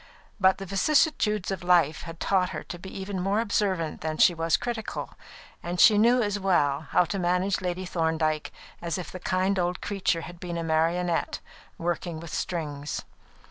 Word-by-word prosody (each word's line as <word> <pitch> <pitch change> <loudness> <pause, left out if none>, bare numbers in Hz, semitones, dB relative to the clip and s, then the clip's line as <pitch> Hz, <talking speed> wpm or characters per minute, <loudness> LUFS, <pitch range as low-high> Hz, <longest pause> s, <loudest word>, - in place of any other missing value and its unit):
But 190 -1 +4
the 195 - -6
vicissitudes 210 - +2
of 195 - -3
life 170 -4 +3
had 165 - -9
taught 185 -2 +2
her - - -5
to 175 - -8
be 190 - -9
even 195 0 -5
more 195 +3 +1
observant 195 -7 0
than 155 -1 -3
she 175 - +6
was 165 -1 +1
critical, 235 -3 -4 0.5
and 175 +1 -4
she 210 -2 +7
knew 240 +3 +4
as 205 -1 -1
well 155 -6 +1
how 180 - +4
to 195 +3 -3
manage 180 +2 +1
Lady 180 0 -3
Thorndyke 160 -3 0 0.3
as 170 -2 -2
if 180 - -6
the 185 - -7
kind 185 +2 0
old 175 0 0
creature 190 -4 -1
had 175 +1 -10
been 175 -2 -5
a 165 - -2
marionette, 165 +2 0 0.4
worked 175 +1 -2
with 165 -1 -7
strings. 150 -4 -3
180 Hz, 180 wpm, -27 LUFS, 165-195 Hz, 0.5 s, she